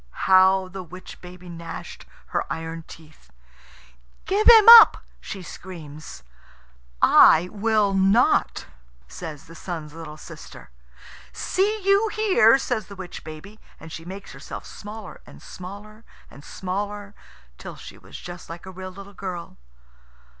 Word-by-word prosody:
How 190 0 +5
the 190 +1 -8
witch 185 +1 -12
baby 180 0 -13
gnashed 170 -1 -9 0.2
her - - -3
iron 165 0 -6
teeth! 155 - -16 1.0
"Give 410 +3 0
him 450 -3 +8
up!" 465 -1 +10 0.2
she 195 -3 -8
screams. 160 -5 -11 0.8
"I 170 +3 +6
will 210 -1 +1
not," 195 +5 +2 0.4
says 155 - -9
the 165 - -14
Sun's 160 -3 -7
little 160 -2 -9
sister. 65 - -13 0.6
"See 410 - -1
you 400 +3 +3
here," 375 - +4
says 235 -6 -3
the 200 - -11
witch 185 -2 -9
baby, 160 +8 -11 0.2
and 160 - -12
she 165 - -8
makes 190 +3 -9
herself - - -9
smaller 210 -1 -10
and - - -14
smaller 205 +4 -11 0.3
and 140 - -14
smaller, 200 +3 -5 0.5
till - - -9
she - - -12
was - - -12
just 175 0 -10
like 170 +2 -9
a 190 - -9
real 185 0 -8
little 200 +2 -12
girl. 180 -3 -7
185 Hz, 135 wpm, -23 LUFS, 165-210 Hz, 1.0 s, up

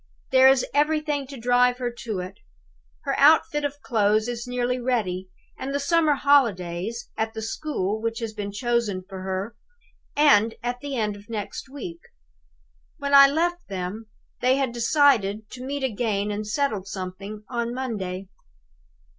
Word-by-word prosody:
There 260 0 +7
is 265 -1 +5
everything 295 -1 +1
to 275 0 -9
drive 245 +1 +3
her 245 -1 -2
to 215 -6 -3
it. 185 +2 -9 0.6
Her - - -1
outfit 295 0 +5
of 290 0 -3
clothes 215 -1 +2
is 240 0 -4
nearly 250 0 -1
ready; 200 -7 -1 0.3
and 275 +2 -3
the - - +1
summer 315 0 +3
holidays, 230 -6 +1
at 220 0 -2
the 220 - -4
school 220 -4 -2
which 225 0 -2
has 225 -2 -4
been 205 -1 -5
chosen 225 -3 -1
for 190 -1 -8
her, 190 +3 -3 0.6
end 230 -7 +5
at 245 0 -2
the 280 +1 -5
end 210 -3 -1
of 205 +2 -15
next 220 +3 -5
week. 335 +5 -7 1.0
When 280 -2 -3
I 275 0 +10
left 345 +4 -1
them, 195 +3 -5 0.3
they 255 +1 +3
had 270 -3 0
decided 230 -5 +2
to 255 - -8
meet 280 +1 -3
again 210 -4 -1
and 210 +1 -4
settle 215 -4 0
something 195 +2 -7
on 235 -1 -2
Monday. 200 -7 -4
235 Hz, 155 wpm, -25 LUFS, 205-275 Hz, 1.0 s, I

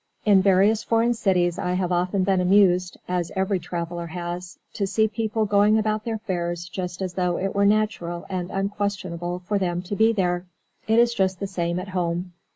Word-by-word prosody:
In 200 -3 +6
various 200 +3 +4
foreign 230 +1 +2
cities 180 -6 +1
I 180 - -1
have 180 -1 -1
often 180 +2 +1
been 190 -1 +2
amused 180 -1 +3
(as 180 -2 -2
every 190 0 0
traveller 170 0 -5
has) 175 +1 -6 0.2
to 200 - -1
see 220 +3 +2
people 220 0 -1
going 205 +1 +4
about 215 0 -1
their 230 -1 -1
affairs 175 -5 -3
just 180 0 -5
as 185 -2 -4
though 180 -1 0
it 195 +1 -2
were 200 0 +3
natural 205 -5 0
and 180 -2 -3
unquestionable 190 -3 -3
for 205 +2 0
them 175 -1 -1
to 195 +3 -4
be 220 +2 +4
there. 180 -4 -1 0.4
It 220 +1 +3
is 235 0 +4
just 190 -3 0
the 200 - -2
same 175 -3 -2
at 185 +2 -7
home. 175 -1 -2
185 Hz, 190 wpm, -24 LUFS, 175-205 Hz, 0.4 s, In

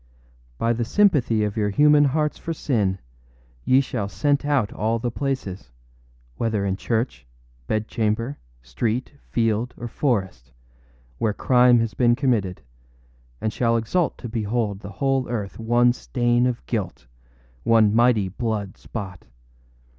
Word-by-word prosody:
By 115 +8 +1
the 120 +1 -1
sympathy 125 - +3
of 105 -1 -2
your 105 -2 0
human 150 +6 +5
hearts 150 +2 0
for 165 - -4
sin 105 -11 0 0.7
ye 130 +1 +5
shall 110 -7 -3
scent 145 +5 +1
out 140 -8 +1
all 110 +2 0
the 120 +1 -3
placesâwhether 60 - -5
in 95 - 0
church, 110 - -2 0.4
bedchamber, 110 +3 -1 0.2
street, 110 - -2 0.2
field, 115 +1 0
or 120 - -5
forestâwhere 60 - -4
crime 125 -1 +5
has 115 -2 -2
been 120 -1 +3
committed, 115 - 0 0.8
and 110 - -2
shall 115 -1 +2
exult 150 +10 0
to 120 - -7
behold 110 -2 -2
the 100 0 -9
whole 135 0 0
earth 105 -5 -4
one 120 +2 +3
stain 120 0 +1
of 120 - -3
guilt, 65 +1 -4 0.6
one 110 - +4
mighty 115 -3 +3
blood 105 0 -3
spot. 95 -5 -7
115 Hz, 130 wpm, -23 LUFS, 100-125 Hz, 0.8 s, human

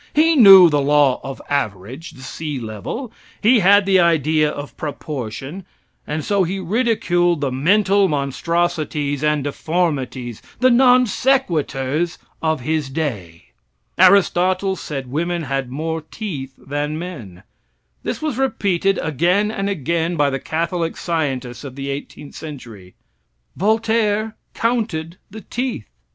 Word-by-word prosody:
He 320 +2 +4
knew 195 - +10
the 145 -3 +1
law 145 -2 +3
of 135 -1 -6
average; 125 - -3
the 130 - -13
sea 150 +1 -5
level; 120 - -6 0.3
he 230 +3 +4
had 200 +1 +5
the 190 -1 +4
idea 155 -2 +3
of 145 -1 -7
proportion; 145 - -6 0.4
and 150 0 -3
so 200 -2 +2
he 185 +3 -2
ridiculed 175 -5 +1
the 140 -2 -1
mental 195 +8 +3
monstrosities 150 0 -1
and 150 -2 +1
deformities 140 -6 -2 0.2
the 255 0 +4
non 250 0 +5
sequiturs 170 - 0 0.2
of 160 -4 0
his 155 +1 -1
day. 110 - -5 0.5
Aristotle 185 0 +4
said 135 -7 -6
women 170 +3 -1
had 135 -2 -2
more 160 +4 -3
teeth 150 -6 -7
than 145 +2 -3
men. 125 - -8 0.6
This - - -4
was 295 -5 -2
repeated 195 -7 +1
again 175 +8 +1
and 200 -2 -2
again 170 0 -1
by 145 -2 +2
the 135 - -2
Catholic 165 +3 -2
scientists 135 -8 -3
of 135 -3 -8
the 140 0 -4
eighteenth 140 +1 -8
century. 115 - -10 0.6
Voltaire 220 +1 +1 0.2
counted 205 -8 -2
the 220 +2 -9
teeth. 245 - -4
160 Hz, 130 wpm, -20 LUFS, 140-195 Hz, 0.6 s, knew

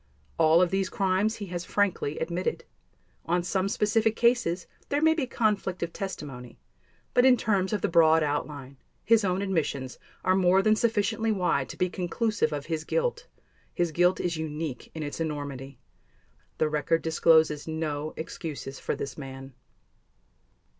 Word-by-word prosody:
All 165 +2 +6
of 180 - 0
these 195 -1 0
crimes 195 +3 +1
he 205 - -6
has 175 0 -3
frankly 185 -7 0
admitted. 175 - -2 0.6
On 175 +1 +1
some 190 +2 0
specific 220 +1 +1
cases 235 -8 +2 0.2
there 285 - +1
may 320 +1 +5
be 300 -5 -2
conflict 205 -7 0
of 170 - -4
testimony 135 -11 -7 0.6
but 245 - +5
in 255 -1 +6
terms 195 -4 0
of 210 -3 -1
the - - +1
broad 160 -1 +5
outline, 145 -2 -3 0.3
his 225 -1 +4
own 190 0 0
admissions 145 -9 -2 0.2
are 185 - +3
more 190 +1 +4
than 215 +1 +4
sufficiently 220 0 +1
wide 180 -9 0
to - - -8
be 180 - +2
conclusive 200 +5 -1
of 145 -1 -4
his 160 -1 -3
guilt. - - -1 0.5
His 175 -2 0
guilt 175 +3 +3
is 170 -2 -1
unique 155 -4 -5
in 160 - -4
its 145 +2 -5
enormity. 140 -4 -4 0.8
The 155 - +2
record 155 +2 0
discloses 160 -2 +3
no 155 -1 -3
excuses 150 -4 -6
for - - -2
this 135 +1 -6
man. 135 -1 -9
175 Hz, 155 wpm, -27 LUFS, 150-205 Hz, 0.8 s, All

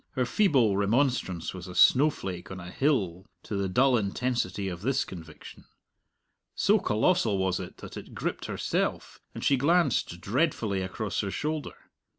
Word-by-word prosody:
Her 130 -3 0
feeble 125 - +3
remonstrance 100 - 0
was 90 -1 -8
a 90 - -9
snowflake 125 - +3
on 95 - -7
a 90 0 -8
hill 100 - 0 0.2
to 105 - -5
the 100 -1 -1
dull 130 +7 +4
intensity 100 -2 -1
of 90 -2 -5
this 135 +5 0
conviction. 80 -4 -11 0.9
So - - +3
colossal 110 - +2
was 95 -1 0
it - - -8
that - - -9
it - - -10
gripped - - -3
herself, - - -2 0.2
and - - -6
she 140 - +3
glanced 140 - +2
dreadfully 110 - 0
across 95 +3 -3
her 100 - -1
shoulder. 150 +7 -4
105 Hz, 155 wpm, -28 LUFS, 95-135 Hz, 0.9 s, dull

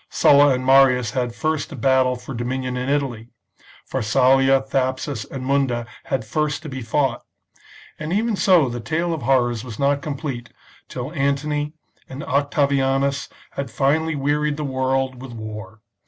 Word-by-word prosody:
Sulla 145 0 +5
and 130 0 -4
Marius 130 -4 +5
had 125 -2 -2
first 155 +5 -1
to - - -8
battle 130 0 +2
for 125 +2 -8
dominion 125 +1 -3
in 125 +1 -2
Italy; 135 -6 -1 0.6
Pharsalia, 135 +3 +3
Thapsus, 130 -2 -2
and 130 -1 -7
Munda 130 -3 +1 0.2
had 130 -5 -2
first 150 +5 -1
to 155 - -6
be 135 -1 -6
fought; 125 +2 0 0.8
and 155 +1 -4
^ven 215 +3 +1
so 180 -7 +4
the 120 0 -4
tale 165 +7 -1
of 160 - -4
horrors 120 -3 +1
was 115 -4 -8
not 140 0 +1
complete 140 -6 -5 0.4
till 130 +5 -5
Antony 145 +1 -1 0.4
and 135 +3 -7
Octavi 140 0 +1
anus 135 +1 0 0.2
had 140 -2 -4
finally 150 +6 +1
wearied 145 +1 0
the 150 - -3
world 130 -1 -1
with 130 -2 -8
war. 110 -1 -8
135 Hz, 155 wpm, -22 LUFS, 125-145 Hz, 0.8 s, Sulla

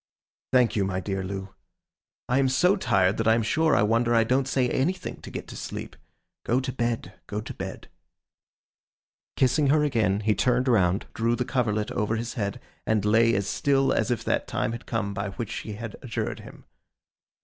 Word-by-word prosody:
'Thank 125 -2 +4
you, 100 - +2
my 95 -1 -1
dear 95 0 -3
Loo. 95 +1 -6 0.7
I 125 +2 +2
am 135 -1 +3
so 180 +10 +4
tired, 95 - +2
that 115 - 0
I 110 - +6
am 115 - +1
sure 160 +7 +2
I - - +4
wonder 115 +2 +2
I 115 - +5
don't 130 +3 +1
say 130 -1 +1
anything 175 +9 -2
to - - -9
get - - -6
to - - -8
sleep. - - -6 0.5
Go 120 +3 +2
to 130 0 -3
bed, 120 -2 -2
go 105 - -3
to 110 - -7
bed.' - - -7 1.5
Kissing 135 +3 +3
her 150 +2 +4
again, 110 -8 +1
he 110 0 +2
turned 125 +5 +1
round, 95 -5 +3
drew 115 +1 +1
the 125 - -2
coverlet 110 -5 0
over 105 +1 0
his 115 +1 -3
head, 100 -4 -3 0.3
and 110 -2 +1
lay 115 +2 +4
as 100 0 0
still 135 +6 +2
as - - 0
if 120 - -1
that - - 0
time - - -1
had 115 0 -7
come 110 -3 -2
by 100 0 -3
which 115 +1 -5
she 110 - -5
had 110 +1 -7
adjured 120 -3 -3
him. - - -13
115 Hz, 195 wpm, -26 LUFS, 105-130 Hz, 1.5 s, I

